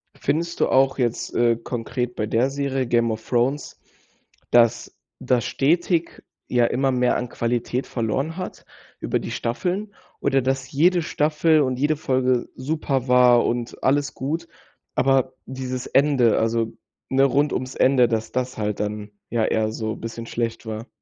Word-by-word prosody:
Findest 170 Hz, +4 st, -2 dB
du -, -, +2 dB
auch 135 Hz, 0 st, +3 dB
jetzt, 120 Hz, -3 st, -1 dB
äh, 115 Hz, -1 st, +3 dB
konkret 120 Hz, +1 st, -4 dB
bei 105 Hz, -, -1 dB
der 115 Hz, +5 st, +1 dB
Serie, 135 Hz, -2 st, -2 dB
„Game 120 Hz, -1 st, +2 dB
of 110 Hz, 0 st, -6 dB
Thrones“, 130 Hz, +4 st, 0 dB, 0.7 s
dass 120 Hz, 0 st, +3 dB, 0.2 s
das 125 Hz, -2 st, +1 dB
stetig, 165 Hz, +5 st, 0 dB, 0.2 s
ja, 120 Hz, -1 st, +3 dB
immer 135 Hz, +3 st, +1 dB
mehr 125 Hz, -1 st, +2 dB
an 125 Hz, -, -4 dB
Qualität 120 Hz, +2 st, -2 dB
verloren 135 Hz, -, -2 dB
hat, 185 Hz, -, -7 dB, 0.3 s
über -, -, -1 dB
die -, -, -6 dB
Staffeln 185 Hz, -, -2 dB, 0.3 s
oder 135 Hz, -1 st, +2 dB
dass 135 Hz, 0 st, -2 dB
jede 175 Hz, +5 st, +3 dB
Staffel 155 Hz, +1 st, +2 dB
und 130 Hz, -2 st, 0 dB
jede 150 Hz, +2 st, +1 dB
Folge 130 Hz, -3 st, 0 dB
super 135 Hz, -2 st, -2 dB
war 125 Hz, -1 st, +5 dB
und 120 Hz, 0 st, -3 dB
alles 140 Hz, +1 st, +2 dB
gut. 160 Hz, +6 st, -3 dB, 0.5 s
Aber 130 Hz, -1 st, +2 dB
dieses 130 Hz, -1 st, -5 dB
Ende, 135 Hz, -5 st, +3 dB
also 115 Hz, 0 st, 0 dB, 0.4 s
ne, 135 Hz, +1 st, +3 dB
rund 140 Hz, +2 st, +2 dB
ums 130 Hz, 0 st, -3 dB
Ende, 130 Hz, -2 st, +4 dB
dass 110 Hz, -1 st, -2 dB
das 130 Hz, 0 st, -2 dB
halt 105 Hz, -1 st, -2 dB
dann, 105 Hz, 0 st, -4 dB, 0.2 s
ja, 115 Hz, -2 st, +1 dB
eher 110 Hz, -1 st, 0 dB
so 110 Hz, 0 st, -3 dB
bisschen 115 Hz, 0 st, -6 dB
schlecht 115 Hz, 0 st, -3 dB
war. 110 Hz, +1 st, -6 dB
130 Hz, 155 wpm, -23 LUFS, 115-140 Hz, 0.7 s, war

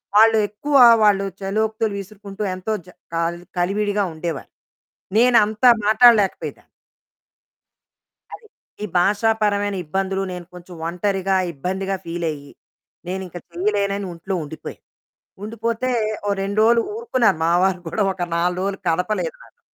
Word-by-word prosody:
వాళ్ళు 225 Hz, +1 st, +6 dB
ఎక్కువ 285 Hz, +8 st, -3 dB, 0.3 s
వాళ్ళు 200 Hz, -2 st, +4 dB, 0.2 s
చలోక్తులు 220 Hz, +2 st, -1 dB
విసురుకుంటూ 200 Hz, +1 st, -8 dB
ఎంతో 185 Hz, +4 st, -3 dB
చ -, -, -25 dB, 0.3 s
క -, -, -2 dB, 0.4 s
కలివిడిగా 205 Hz, +3 st, 0 dB
ఉండేవారు. 160 Hz, -2 st, -5 dB, 0.7 s
నేను 245 Hz, +1 st, +5 dB
అంతా 215 Hz, +4 st, +3 dB, 0.2 s
మాట్లాడలేకపోయేదాన్ని. 215 Hz, -2 st, +3 dB, 1.7 s
అది. 445 Hz, -, -11 dB, 0.4 s
ఈ -, -, 0 dB
భాషాపరమైన 205 Hz, +1 st, +1 dB
ఇబ్బందులు, 190 Hz, +3 st, -1 dB
నేను 180 Hz, -1 st, -7 dB
కొంచెం 180 Hz, 0 st, -12 dB
ఒంటరిగా, 190 Hz, +2 st, -1 dB, 0.2 s
ఇబ్బందిగా, 190 Hz, +6 st, -3 dB
ఫీలయ్యి, 165 Hz, -4 st, -4 dB, 0.6 s
నేనింక 185 Hz, -1 st, -5 dB
చేయలేనని 200 Hz, +2 st, -1 dB
ఇంట్లో 170 Hz, +4 st, -6 dB
ఉండిపోయాను. 155 Hz, +1 st, -9 dB, 0.6 s
ఉండిపోతే 230 Hz, +3 st, -2 dB, 0.4 s
ఓ -, -, 0 dB
2 200 Hz, +2 st, -3 dB
రోజులు 230 Hz, +1 st, +5 dB
ఊరుకున్నారు 255 Hz, -, +1 dB
మా 165 Hz, -, +2 dB
వారు 190 Hz, -1 st, +2 dB
కూడా 170 Hz, +6 st, -1 dB
ఒక 185 Hz, -1 st, -6 dB
4 180 Hz, +1 st, 0 dB
రోజులు 195 Hz, 0 st, -2 dB
కదపలేదు 210 Hz, -, -1 dB
నన్ను. -, -, -21 dB
200 Hz, 120 wpm, -21 LUFS, 180-215 Hz, 1.7 s, వాళ్ళు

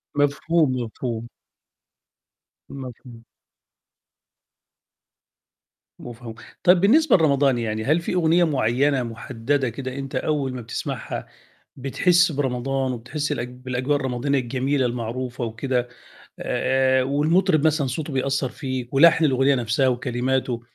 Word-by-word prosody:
مفهوم، 145 Hz, +1 st, +2 dB
مفهوم. 115 Hz, 0 st, -5 dB, 1.4 s
مفهوم. 125 Hz, -3 st, -10 dB, 2.8 s
مفهوم، 115 Hz, -1 st, -9 dB, 0.3 s
طيب 180 Hz, 0 st, +5 dB
بالنسبة 285 Hz, +8 st, +5 dB
لرمضان، 140 Hz, -5 st, +3 dB
يعني 110 Hz, -1 st, -2 dB
هل 155 Hz, +7 st, +2 dB
في 170 Hz, -, -3 dB
أغنية 175 Hz, 0 st, +3 dB
مُعينة 135 Hz, -2 st, +1 dB
مُحددة 120 Hz, +3 st, -2 dB
كده 130 Hz, +2 st, -6 dB
أنت 135 Hz, -1 st, -6 dB
أول 140 Hz, -4 st, -1 dB
ما 125 Hz, -, -5 dB
بتسمعها 115 Hz, -, -5 dB, 0.5 s
بتحسّ 175 Hz, +6 st, +2 dB
برمضان 135 Hz, -1 st, -1 dB
وبتحسّ 145 Hz, +6 st, -4 dB
الأج 125 Hz, -4 st, -3 dB
بالأجواء 130 Hz, +3 st, -2 dB
الرمضانية 135 Hz, +1 st, -1 dB
الجميلة 130 Hz, +2 st, -1 dB
المعروفة 120 Hz, +1 st, -4 dB
وكده، 120 Hz, +2 st, -2 dB, 0.5 s
آآ 130 Hz, 0 st, +1 dB
والمطرب 155 Hz, +4 st, +2 dB
مثلًا 150 Hz, -3 st, +1 dB
صوته 145 Hz, +3 st, -4 dB
بيأثّر 135 Hz, 0 st, 0 dB
فيك 130 Hz, -3 st, -5 dB
ولحن 165 Hz, +3 st, +6 dB
الأغنية 135 Hz, 0 st, +3 dB
نفْسها 125 Hz, +2 st, +1 dB
وكلماته، 125 Hz, 0 st, -1 dB
130 Hz, 105 wpm, -23 LUFS, 125-145 Hz, 2.8 s, ولحن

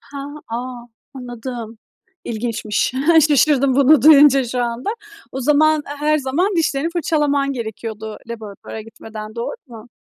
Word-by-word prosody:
Ha. 280 Hz, -1 st, -8 dB, 0.2 s
A, 240 Hz, +1 st, -6 dB, 0.3 s
anladım. 240 Hz, -2 st, -7 dB, 0.5 s
İlginçmiş. 225 Hz, -1 st, -2 dB, 0.4 s
Şaşırdım 275 Hz, -2 st, +3 dB
bunu 280 Hz, 0 st, +5 dB
duyunca 285 Hz, -3 st, +7 dB
şu 245 Hz, +1 st, -2 dB
anda. 240 Hz, -, -3 dB, 0.4 s
O 265 Hz, -, -4 dB
zaman, 300 Hz, +3 st, +3 dB
her 295 Hz, +1 st, 0 dB
zaman 335 Hz, +8 st, 0 dB
dişlerini 315 Hz, -1 st, 0 dB
fırçalaman 295 Hz, -4 st, 0 dB
gerekiyordu 220 Hz, -2 st, -6 dB
laboratuvara 220 Hz, -1 st, -8 dB
gitmeden, 215 Hz, -1 st, -10 dB
doğru 235 Hz, -, -4 dB
mu? 235 Hz, -1 st, -12 dB
255 Hz, 120 wpm, -19 LUFS, 230-290 Hz, 0.5 s, duyunca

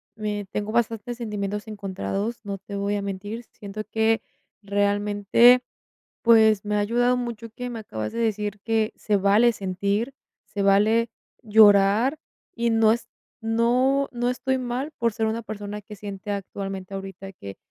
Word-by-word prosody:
me 210 Hz, -1 st, -3 dB
tengo 210 Hz, +1 st, -3 dB
bastantes 235 Hz, 0 st, 0 dB
sentimientos 210 Hz, -2 st, -4 dB
encontrados. 200 Hz, +2 st, -4 dB
No 200 Hz, -1 st, -4 dB
te 200 Hz, +1 st, -9 dB
voy 200 Hz, +1 st, -1 dB
a -, -, -2 dB
mentir. 205 Hz, +4 st, -5 dB
Siento 210 Hz, +1 st, -7 dB
que 225 Hz, 0 st, +2 dB, 0.4 s
realmente, 205 Hz, +4 st, +4 dB, 0.6 s
pues, 220 Hz, -3 st, +5 dB
me 210 Hz, 0 st, -1 dB
ha 210 Hz, -, +2 dB
ayudado 245 Hz, +4 st, +2 dB
mucho 235 Hz, -2 st, -4 dB
que 245 Hz, +2 st, -6 dB
me 230 Hz, -2 st, -5 dB
acabas 110 Hz, -, -5 dB
de 235 Hz, -, -4 dB
decir 210 Hz, -2 st, -1 dB
que 225 Hz, -1 st, +1 dB
se 210 Hz, -, 0 dB
vale 205 Hz, +5 st, +4 dB
sentir, 200 Hz, +5 st, -2 dB, 0.3 s
se 205 Hz, 0 st, -4 dB
vale 215 Hz, +4 st, +4 dB, 0.3 s
llorar 215 Hz, +5 st, +5 dB, 0.3 s
y 235 Hz, 0 st, 0 dB
no 225 Hz, -1 st, +4 dB
es 235 Hz, +2 st, -1 dB, 0.3 s
no 245 Hz, +5 st, +2 dB
no 240 Hz, 0 st, -1 dB
estoy 260 Hz, +1 st, -1 dB
mal 255 Hz, +4 st, -3 dB
por 230 Hz, -2 st, +1 dB
ser 225 Hz, 0 st, -1 dB
una 220 Hz, +1 st, -1 dB
persona 210 Hz, -1 st, -6 dB
que 210 Hz, +1 st, -11 dB
siente 200 Hz, +1 st, -8 dB
actualmente 195 Hz, -1 st, -5 dB
ahorita 195 Hz, 0 st, -7 dB
que, 100 Hz, -, -10 dB
215 Hz, 155 wpm, -24 LUFS, 200-230 Hz, 0.6 s, pues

